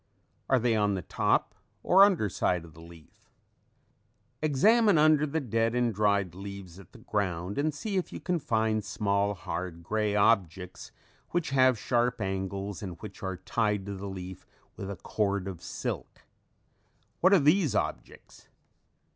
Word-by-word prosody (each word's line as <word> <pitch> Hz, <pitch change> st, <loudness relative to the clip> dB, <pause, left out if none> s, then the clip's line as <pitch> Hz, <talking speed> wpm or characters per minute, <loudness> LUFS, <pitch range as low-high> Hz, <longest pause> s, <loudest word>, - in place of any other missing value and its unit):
Are 130 Hz, -, +5 dB
they 120 Hz, -1 st, +1 dB
on 105 Hz, -2 st, +1 dB
the 95 Hz, -, -4 dB
top -, -, 0 dB, 0.3 s
or 190 Hz, +2 st, +7 dB
under 185 Hz, -, +3 dB
side 90 Hz, -2 st, -1 dB
of 80 Hz, -, -15 dB
the 80 Hz, -, -14 dB
leaf? 85 Hz, -1 st, -17 dB, 1.1 s
Examine 205 Hz, -, +4 dB
under 155 Hz, 0 st, +4 dB
the 155 Hz, +3 st, -1 dB
dead 115 Hz, -3 st, 0 dB
and 120 Hz, -2 st, +1 dB
dried 100 Hz, -3 st, +1 dB
leaves 95 Hz, -1 st, -9 dB
at 95 Hz, -, -15 dB
the -, -, -14 dB
ground 95 Hz, 0 st, -2 dB
and 155 Hz, +2 st, +1 dB
see 195 Hz, +8 st, -4 dB
if 185 Hz, -, -2 dB
you -, -, -6 dB
can 180 Hz, -2 st, -1 dB
find 110 Hz, -5 st, 0 dB
small, 100 Hz, 0 st, 0 dB
hard, 85 Hz, -1 st, -5 dB
gray 105 Hz, +3 st, -1 dB
objects 95 Hz, -4 st, +1 dB, 0.4 s
which 175 Hz, -5 st, -1 dB
have 130 Hz, -2 st, +4 dB
sharp 120 Hz, +2 st, 0 dB
angles 95 Hz, 0 st, -3 dB
and 90 Hz, -4 st, -7 dB
which 105 Hz, -2 st, -9 dB
are 95 Hz, -2 st, -4 dB
tied 105 Hz, +1 st, -1 dB
to 100 Hz, -, -5 dB
the 100 Hz, +1 st, -6 dB
leaf 95 Hz, -1 st, -8 dB, 0.3 s
with 95 Hz, -, -6 dB
a 100 Hz, -, -4 dB
cord 100 Hz, +1 st, -2 dB
of 95 Hz, -4 st, -7 dB
silk. -, -, -6 dB, 1.0 s
What 185 Hz, -, +4 dB
are 200 Hz, -, +7 dB
these 155 Hz, +1 st, +3 dB
objects? -, -, -5 dB
105 Hz, 160 wpm, -28 LUFS, 95-130 Hz, 1.1 s, or